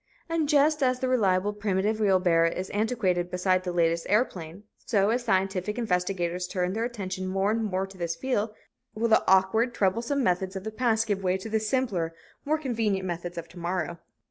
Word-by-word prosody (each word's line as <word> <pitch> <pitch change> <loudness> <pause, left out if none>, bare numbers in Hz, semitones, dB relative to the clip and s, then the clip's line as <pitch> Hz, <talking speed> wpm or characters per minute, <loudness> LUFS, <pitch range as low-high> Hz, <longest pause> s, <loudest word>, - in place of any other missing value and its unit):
And 330 -3 0
just 300 +1 +4
as 255 -1 +2
the 260 - -1
reliable, 205 -5 +2
primitive 205 +1 0
wheelbarrow 180 -5 +3
is 185 +3 -5
antiquated 205 -5 0
beside 185 0 +1
the 180 - -2
latest 170 -1 +1
airplane, 190 -4 -1 0.2
so, 205 -2 +2
as 240 +1 0
scientific 195 -1 0
investigators 180 -4 -1
turn 180 0 -1
their 225 +2 -1
attention 190 -6 -4
more 195 +2 +1
and 225 +1 0
more 190 -2 -1
to 195 -1 -14
this 170 -1 -2
field, 220 +1 -1 0.4
will 230 +2 0
the 220 - +5
awkward, 190 +6 +3
troublesome 230 +8 +1
methods 185 -1 0
of 190 - -5
the 220 - -4
past 225 -1 +1
give 205 -3 -1
way 185 0 +1
to 190 +4 -8
the 220 0 +1
simpler, 215 -8 -1 0.3
more 305 +2 +2
convenient 225 -9 -1
methods 175 0 -4
of 170 0 -5
the 180 - -12
morrow. 170 -1 -2
195 Hz, 190 wpm, -27 LUFS, 180-225 Hz, 0.4 s, the